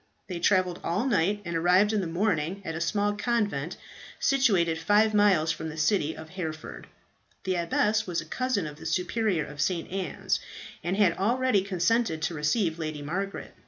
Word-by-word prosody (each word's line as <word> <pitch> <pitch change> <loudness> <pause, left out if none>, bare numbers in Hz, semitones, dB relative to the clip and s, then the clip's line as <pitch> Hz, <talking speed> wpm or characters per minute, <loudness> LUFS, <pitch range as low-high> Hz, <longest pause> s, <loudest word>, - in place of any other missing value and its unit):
They 180 -3 -5
travelled 185 -1 +2
all 185 +8 0
night, 205 -3 +1
and 170 -1 -3
arrived 180 +6 +4
in 210 - +1
the 180 - -3
morning 180 0 -1
at 165 - -3
a 160 - -4
small 205 +4 +1
convent 205 - -1 0.4
situated 195 -12 +2
five 210 +5 +3
miles 195 -7 +4
from 160 0 -5
the 155 - -8
city 160 -1 +1
of 160 0 -9
Hereford. 155 - -6 0.6
The 185 -1 0
abbess 210 +6 +1
here 225 - -14
was 175 -2 -1
a - - -6
cousin 255 -8 -1
of 150 -1 -7
the - - -7
Superior 180 -3 0
of 145 0 -6
St. 175 0 -1
Anne's, 190 -1 -2 0.4
and 180 +4 -1
had 200 -5 +4
already 240 +1 +2
consented 185 -2 0
to 170 - -1
receive 160 +2 0
Lady 155 -2 -4
Margaret. 195 +6 -4
185 Hz, 180 wpm, -27 LUFS, 165-205 Hz, 0.6 s, arrived